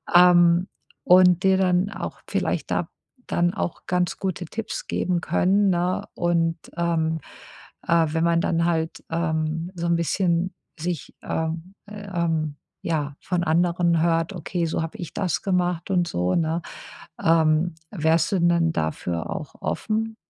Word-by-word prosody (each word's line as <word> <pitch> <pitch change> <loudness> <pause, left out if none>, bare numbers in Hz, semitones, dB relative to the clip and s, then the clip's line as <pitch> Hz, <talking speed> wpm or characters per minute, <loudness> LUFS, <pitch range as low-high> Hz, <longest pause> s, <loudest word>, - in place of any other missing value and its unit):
Ähm, 175 0 +6 0.4
und 180 0 +6
dir 190 0 +4
dann 185 +1 +2
auch - - -6
vielleicht - - -1
da - - 0 0.4
dann 175 +1 +1
auch 175 - -4
ganz 180 -1 0
gute 185 -2 -3
Tipps 215 +6 -5
geben 180 -2 0
können, 195 +3 +2
ne? 180 0 0
Und, 170 -1 +1 0.2
ähm, 160 -2 0 0.7
äh, 165 -1 +4
wenn 160 0 0
man 170 0 +3
dann 170 0 +1
halt, 165 -1 -1
ähm, 165 0 -1
so 170 -1 -3
`n 170 - +3
bisschen 170 +1 0 0.3
sich, 170 -2 -4
äh, 160 - -2 0.4
ähm 170 -7 -2 0.3
ja, 150 -4 -2
von 175 -2 -1
anderen 170 0 +2
hört: 165 +1 +1
„Okay, 175 0 -2
so 165 0 -1
habe 165 +6 -6
ich 175 -6 -7
das 180 -5 -1
gemacht.“ 180 -1 0
Und 175 -2 +2
so, 90 - 0
ne? 165 0 0 0.6
Ähm, 160 0 +3 0.2
wärst 165 -2 +1
du 195 - +2
denn 170 -1 +3
dafür 80 - -2
auch 150 - -6
offen? 225 0 -2
170 Hz, 145 wpm, -24 LUFS, 165-180 Hz, 0.7 s, Ähm